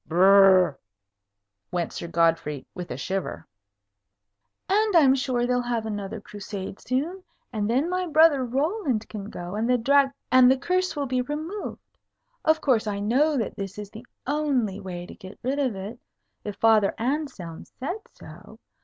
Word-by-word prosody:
"Brrrrooo!" 185 -2 +6 0.9
went 175 -1 -2
Sir 170 - -5
Godfrey, 165 -4 +1
with 180 -1 -7
a - - -5
shiver. 190 0 -4 1.2
"And 420 +1 +2
I'm 280 -6 +7
sure 255 -2 0
they'll 250 0 +1
have 240 -2 -2
another 210 0 -4
Crusade 200 -1 -7
soon; 315 +10 -2 0.3
and 210 -1 -1
then 265 +7 +2
my 365 0 -1
brother 310 -3 +5
Roland 270 - -1
can 210 -2 -7
go, 175 -2 -7
and 220 +3 -1
the 250 - +4
Drag 275 +3 +4 0.2
and 255 -1 +7
the 265 - +4
curse 365 +6 0
will 290 -1 -1
be 255 -1 0
removed. 310 +10 -5 0.6
Of 315 0 +3
course, 235 -6 +2
I 200 -1 -2
know 275 +9 +2
that 225 - -2
is 195 -1 -5 0.2
the 230 +3 -11 0.2
only 265 -9 0
way 180 -3 -6
to - - -11
get 190 -1 -12
rid 270 +3 -1
of 260 -7 0
it, 200 +5 -7 0.4
if 205 -2 -5
Father 215 -2 +3
Anselm 245 - -3
said 355 +11 -5
so. - - -14
240 Hz, 160 wpm, -25 LUFS, 200-285 Hz, 1.2 s, I'm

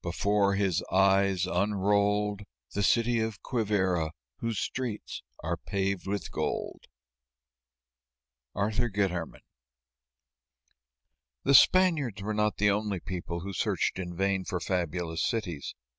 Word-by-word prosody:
Before 100 +3 +1
his 95 -4 +1
eyes, 95 -1 +3
unrolled 100 +2 +1 0.3
The 100 - -1
City 115 +5 +3
of 110 -3 -2
Quivíra 95 - 0 0.3
whose 115 -2 -3
streets 120 -2 -4 0.2
are 85 +2 -1
paved 95 +2 -2
with 100 -3 -3
gold. - - -3 1.7
ARTHUR 110 +4 0
GUITERMAN. 95 -5 -2 2.0
The 140 - +3
Spaniards 155 - +5
were 110 +1 -2
not 105 0 +1
the 105 0 +4
only 105 -2 -1
people 85 -2 -5
who 100 +2 -6
searched 90 - 0
in 90 -1 -5
vain 95 +1 +1
for 90 -1 -3
fabulous 85 -2 -2
cities. 90 - -3
100 Hz, 115 wpm, -29 LUFS, 90-105 Hz, 2.0 s, Spaniards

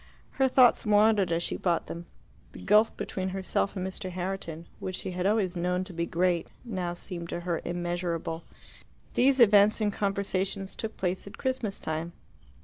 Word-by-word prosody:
Her 265 - +2
thoughts 255 -2 +5
wandered 210 -3 +4
as 165 +1 +1
she - - -2
bought 170 -3 0
them: 170 +1 -7 0.5
the - - -10
gulf 210 +2 +4
between 190 0 -3
herself 190 +1 -1
and 185 -1 -2
Mr. 190 0 -5
Herriton, 175 -3 -4
which 185 - -4
she 185 - -5
had 180 +1 -1
always 200 -4 +1
known 180 +1 0
to 185 -1 -9
be 170 0 -2
great, 175 0 +1 0.2
now 180 -6 -3
seemed 170 -2 -6
to 175 - -3
her 170 -1 -2
immeasurable. 175 -1 -2 0.7
These 265 +2 +4
events 210 -2 +6
and 210 -2 +1
conversations 195 -1 -1
took 220 0 -5
place 185 +1 -2
at 200 - -10
Christmas 255 -6 -2
time. 160 +2 -4
185 Hz, 170 wpm, -28 LUFS, 175-205 Hz, 0.7 s, events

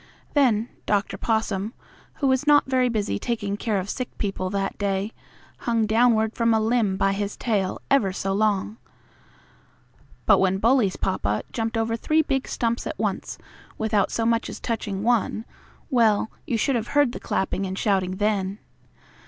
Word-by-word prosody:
Then 240 -6 +3 0.2
Dr. 205 -1 +1
Possum, 220 -1 -1 0.4
who 280 - 0
was 260 +2 +1
not 295 -1 +6
very 255 -1 +2
busy 205 - -1
taking 205 -4 -2
care 210 0 -1
of 190 0 -3
sick 255 +4 -3
people 195 -2 -2
that 195 0 -2
day, 200 +1 -1 0.5
hung 230 -2 +1
downward 220 0 +3
from 230 -1 +2
a - - +3
limb 220 -3 +1
by 195 0 +2
his 200 +1 -3
tail 205 -5 -1
ever 225 -9 +4
so 195 +1 -2
long, 210 +1 0 1.5
but - - +6
when 190 0 +2
Bully's 225 -2 +3
papa 105 - -1
jumped 225 0 -2
over 225 0 0
three 310 +7 +2
big 270 -2 -1
stumps 235 -1 -1
at - - -5
once, - - -2 0.4
without 215 -2 +1
so 225 - -1
much 230 0 +1
as - - -7
touching 210 -4 -3
one 225 -1 +1 0.5
well, 220 -4 +3 0.2
you 235 - 0
should 265 +4 +1
have 230 -1 -1
heard 290 -4 +5
the - - -7
clapping 190 0 -1
and 190 +1 -5
shouting 190 -3 +1
then! 200 -1 0
220 Hz, 165 wpm, -24 LUFS, 195-235 Hz, 1.5 s, not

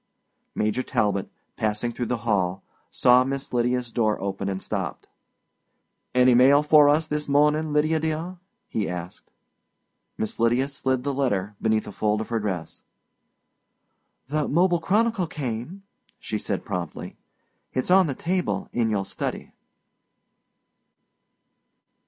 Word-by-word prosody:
Major 110 +4 0
Talbot, 100 -5 0 0.3
passing 110 +2 -1
through 120 0 -4
the 125 - -1
hall, 95 -4 0 0.3
saw 125 +1 +5
Miss 135 0 -4
Lydia's 125 0 0
door 110 -3 +1
open 100 0 -3
and 95 -1 -3
stopped. - - -4 1.1
"Any 125 0 +6
mail 135 +4 +6
for 150 -1 +6
us 155 +2 +2
this 150 -1 -3
morning, 150 +2 +3
Lydia, 155 +2 +2
dear?" 160 +3 -3 0.3
he 105 -3 -2
asked. 90 0 -7 0.9
Miss 110 - -3
Lydia 120 +4 +2
slid 130 -2 -1
the 140 0 -1
letter 105 -7 -1
beneath 110 -1 +1
a 105 - -7
fold 105 +1 0
of 110 - -5
her 115 -1 0
dress. 95 -6 -4 1.5
"The 150 +1 -1
Mobile 175 +2 +3
Chronicle 205 +2 +1
came," 140 - -5 0.4
she - - -4
said - - -3
promptly. - - -5 0.6
"It's 130 +7 -2
on 190 -1 +6
the 140 - -3
table 180 +4 -2
in 115 -2 0
your 100 -3 -1
study." - - -5
125 Hz, 130 wpm, -25 LUFS, 110-150 Hz, 1.5 s, Any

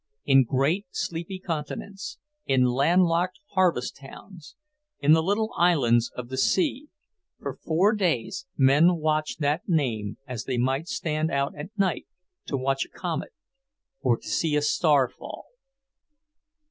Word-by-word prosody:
In 135 -2 +5
great 145 - 0
sleepy 175 +1 -4
continents, 190 - -5 0.3
in 130 -1 +3
land 140 +9 +3
locked 175 +2 0
harvest 180 -10 +1
towns, 155 +4 -13 0.4
in 145 +1 +3
the 160 +1 +6
little 205 +6 0
islands 125 -9 +3
of 125 -1 -6
the 130 0 -3
sea, 300 - +1 0.5
for - - -6
four 180 +7 +3
days 190 - -1
men 145 +6 +5
watched 155 -1 -1
that 150 +6 0
name 115 - 0
as 125 -3 -6
they 130 -2 -2
might 135 +6 0
stand 155 -2 -1
out 140 -2 -1
at 150 +3 -7
night 195 -3 0 0.4
to 140 - -1
watch 135 +1 0
a - - -13
comet, - - -4 0.7
or 120 -2 +2
to - - -14
see 160 -3 0
a 150 - +2
star 145 -3 +3
fall. - - -10
155 Hz, 145 wpm, -26 LUFS, 135-180 Hz, 0.7 s, the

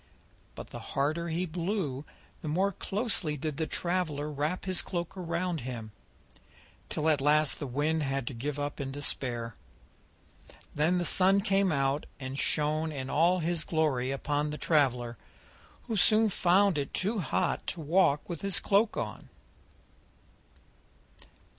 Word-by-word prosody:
But - - -9
the - - -6
harder 155 +5 -1
he 170 +2 -1
blew 170 -5 -2 0.4
the - - -6
more 185 +6 +2
closely 195 -6 -1
did 150 0 -3
the 160 - -1
traveller 160 -5 -1
wrap 150 +6 -2
his 185 -2 0
cloak 175 -2 -4
round 175 -1 -2
him, 115 -3 -6 1.0
till 155 - -1
at 150 -3 +3
last 150 0 +3
the 145 - -4
Wind 150 +5 0
had 135 -3 -1
to 130 - -4
give 140 +5 -3
up 145 0 -3
in 135 -1 -4
despair. 125 -4 -2 1.2
Then 160 +5 +2
the 175 - 0
Sun 195 +3 +5
came 195 -2 +2
out 135 0 0
and 130 0 -5
shone 155 +1 +1
in 135 -3 -5
all 175 +4 +3
his 165 -1 0
glory 150 -7 +1
upon 145 +2 -1
the 150 - -4
traveller, 125 -8 +1 0.6
who 230 - -3
soon 215 +3 +5
found 190 -2 +3
it 140 - -3
too 210 +4 0
hot 175 - -1
to 175 - -3
walk 150 -2 +3
with 170 -3 -5
his 195 -2 +2
cloak 205 +2 +2
on. - - -5
155 Hz, 145 wpm, -30 LUFS, 140-180 Hz, 1.2 s, Sun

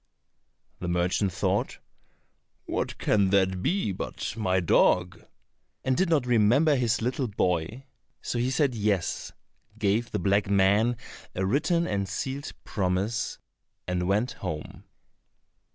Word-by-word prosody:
The 90 - -4
merchant 90 +3 +1
thought, - - -1 0.9
"What - - -3
can 100 -2 +2
that 95 -1 +2
be 180 - 0
but 95 - -4
my 95 -4 +1
dog?" 90 +1 +2 0.6
and 130 - +1
did 185 +3 +1
not 150 -6 +2
remember 125 +6 +4
his 120 -2 +1
little 125 +2 -1
boy, 95 +4 -1 0.3
so 120 - -3
he 125 +2 +1
said 135 0 +1
yes, 105 -5 -1 0.5
gave 110 +2 +1
the - - -2
black 100 +2 +1
man 100 +4 +3 0.4
a 95 - 0
written 160 - +1
and 100 - -2
sealed 135 +7 -4
promise, 100 +3 -1 0.5
and 90 -1 -1
went 105 +6 +1
home. 80 -5 -6
105 Hz, 125 wpm, -27 LUFS, 95-125 Hz, 0.9 s, remember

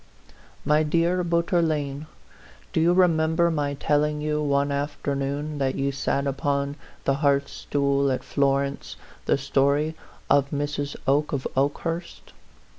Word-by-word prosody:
MY 150 +2 +4
DEAR 170 +3 +1
BOUTOUKLLNE, 165 -4 0 0.7
Do 160 - +2
you 170 +2 +4
remem 160 -3 +3
ber 170 0 +3
my 145 -2 -1
telling 150 +1 +1
you, 150 0 -1
one 140 -1 +1
afternoon 145 +1 -2
that 135 -1 0
you 140 0 0
sat 140 0 -1
upon 140 0 -1 0.3
the 135 0 +1
hearthstool 140 -1 +1
at 130 - -2
Florence, 140 0 0 0.3
the - - +3
story 140 +3 +1 0.3
of 140 -1 +3
Mrs. 145 0 -3
Oke 145 +3 +2
of 135 -2 -2
Okehurst? 165 +5 -2
145 Hz, 125 wpm, -25 LUFS, 140-155 Hz, 0.7 s, MY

